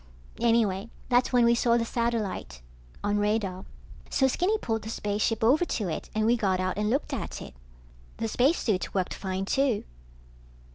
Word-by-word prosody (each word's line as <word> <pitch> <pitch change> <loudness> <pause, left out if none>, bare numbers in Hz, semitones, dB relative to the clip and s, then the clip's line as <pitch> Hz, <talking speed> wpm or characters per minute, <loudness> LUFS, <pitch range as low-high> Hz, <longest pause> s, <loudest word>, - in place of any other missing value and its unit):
Anyway 225 -3 +2 0.2
that's 245 0 +3
when 245 -2 +4
we 235 - +5
saw 235 0 +3
the 230 - 0
satellite 225 - -2 0.4
on 205 0 +1
radar. 205 -3 -1 0.4
So 265 - +3
Skinny 365 +11 +1
pulled 225 - -2
the 220 - -7
spaceship 210 +1 -1
over 275 +9 +5
to 215 - -2
it 160 - -4
and 215 0 +2
we 235 +2 +4
got 195 -5 +1
out 185 0 -1
and 210 0 +1
looked 270 +6 -1
at - - -4
it. - - -9 0.6
The 225 - -2
spacesuits 235 - +1
worked 185 -2 0
fine, 190 0 -3
too. 265 0 +1
225 Hz, 165 wpm, -27 LUFS, 200-240 Hz, 0.6 s, we